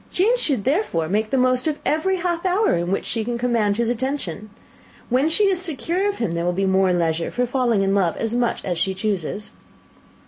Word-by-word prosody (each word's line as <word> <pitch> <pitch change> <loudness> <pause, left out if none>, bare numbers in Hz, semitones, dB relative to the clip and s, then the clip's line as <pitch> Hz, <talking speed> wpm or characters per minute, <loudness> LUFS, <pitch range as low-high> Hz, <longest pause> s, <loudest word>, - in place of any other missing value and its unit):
Jane 425 +7 +3
should 280 - -1
therefore 265 - 0
make 215 +5 0
the 265 - +1
most 255 +2 +2
of 305 -1 0
every 350 +5 +1
half 345 -2 -2
hour 380 - +2
in 175 +1 -2
which 195 - -1
she 225 -1 -2
can 240 +1 -3
command 230 -4 +1
his 235 -1 +1
attention. 240 - -3 0.6
When 260 +5 +2
she 330 +6 +2
is 385 -3 +2
secure 360 +4 -1
of 405 - -4
him, 230 -8 -1
there 170 0 -2
will 175 +1 0
be 195 +2 0
leisure 175 -4 +1
for 250 - -1
falling 240 -5 +1
in 195 0 +1
love 185 -4 +1
as 225 0 -2
much 240 -1 -1
as 175 -3 -2
she 190 -1 0
chooses." 200 0 -3
235 Hz, 210 wpm, -22 LUFS, 195-310 Hz, 0.6 s, Jane